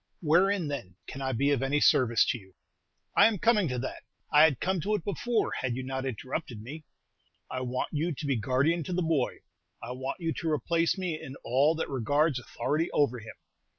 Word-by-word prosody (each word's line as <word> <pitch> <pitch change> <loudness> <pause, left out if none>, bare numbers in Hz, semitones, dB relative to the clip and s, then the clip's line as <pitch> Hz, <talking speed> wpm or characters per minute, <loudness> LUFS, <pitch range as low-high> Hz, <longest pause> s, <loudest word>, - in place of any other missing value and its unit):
"Wherein, 180 +3 +3
then, 120 -11 -5
can 135 - -8
I 135 0 -1
be 140 +4 +1
of 140 -3 +1
any 135 +2 +1
service 120 -6 +4
to - - 0
you?" 95 -2 -19 0.6
"I - - +7
am 225 -2 0
coming 210 -2 +3
to 125 -2 -2
that. 130 +2 -5 0.3
I 150 +1 +8
had 150 -6 +1
come 190 -2 0
to 210 +6 0
it 195 - -4
before, 220 +5 -1
had 125 -2 -1
you 130 - -4
not 130 +1 -3
interrupted 130 0 -5
me. 145 +8 -9 0.7
I 130 - -3
want 125 0 -2
you 160 +3 -1
to 150 0 -5
be 140 -2 +1
guardian 135 +8 +1
to 180 - -4
the 180 0 0
boy. 160 -6 0 0.4
I 115 - -7
want 130 +5 -4
you 165 -2 -1
to 165 - -2
replace 165 +4 +1
me 175 -4 -3
in 135 - -8
all 140 +6 +3
that 160 - -2
regards 140 +3 +1
authority 145 +8 -2
over 125 -4 +1
him. 115 0 -10
145 Hz, 210 wpm, -29 LUFS, 130-165 Hz, 0.7 s, I